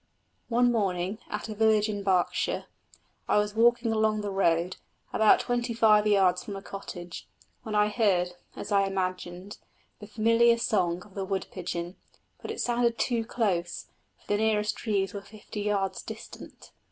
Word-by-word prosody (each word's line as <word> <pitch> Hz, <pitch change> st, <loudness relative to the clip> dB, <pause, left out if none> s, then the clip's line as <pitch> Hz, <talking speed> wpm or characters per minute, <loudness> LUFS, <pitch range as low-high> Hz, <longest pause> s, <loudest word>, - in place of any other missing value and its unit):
One 245 Hz, +1 st, +3 dB
morning, 195 Hz, -2 st, -1 dB
at 210 Hz, +1 st, -4 dB
a 220 Hz, -, -5 dB
village 215 Hz, 0 st, +3 dB
in 205 Hz, -1 st, -3 dB
Berkshire, 190 Hz, -3 st, 0 dB, 0.6 s
I -, -, +3 dB
was 210 Hz, 0 st, +1 dB
walking 235 Hz, +1 st, +3 dB
along 215 Hz, -1 st, +1 dB
the 205 Hz, -1 st, -3 dB
road, 175 Hz, -2 st, +1 dB, 0.4 s
about 220 Hz, -1 st, +5 dB
twenty 240 Hz, -1 st, -1 dB
five 215 Hz, -2 st, +5 dB
yards 190 Hz, -3 st, +3 dB
from 200 Hz, -, -6 dB
a 195 Hz, -, -6 dB
cottage, 180 Hz, -2 st, -8 dB, 0.3 s
when 215 Hz, -1 st, -5 dB
I 210 Hz, 0 st, +4 dB
heard, 195 Hz, -5 st, +2 dB, 0.2 s
as -, -, -7 dB
I 200 Hz, -1 st, +3 dB
imagined, 185 Hz, 0 st, -4 dB, 0.4 s
the 210 Hz, -, -10 dB
familiar 230 Hz, +2 st, +4 dB
song 180 Hz, -6 st, 0 dB
of 205 Hz, -, -18 dB
the 195 Hz, -, -3 dB
wood 190 Hz, 0 st, -2 dB
pigeon; 175 Hz, -1 st, -5 dB, 0.4 s
but -, -, -7 dB
it -, -, -5 dB
sounded 240 Hz, -1 st, +1 dB
too 235 Hz, -3 st, 0 dB
close, 180 Hz, -8 st, -2 dB, 0.3 s
for -, -, -28 dB
the 205 Hz, -, +1 dB
nearest 215 Hz, -1 st, +1 dB
trees 200 Hz, -4 st, -1 dB
were 200 Hz, -, -5 dB
fifty 210 Hz, +1 st, -8 dB
yards 200 Hz, -2 st, -1 dB
distant. 220 Hz, 0 st, -10 dB
205 Hz, 165 wpm, -28 LUFS, 190-220 Hz, 0.6 s, about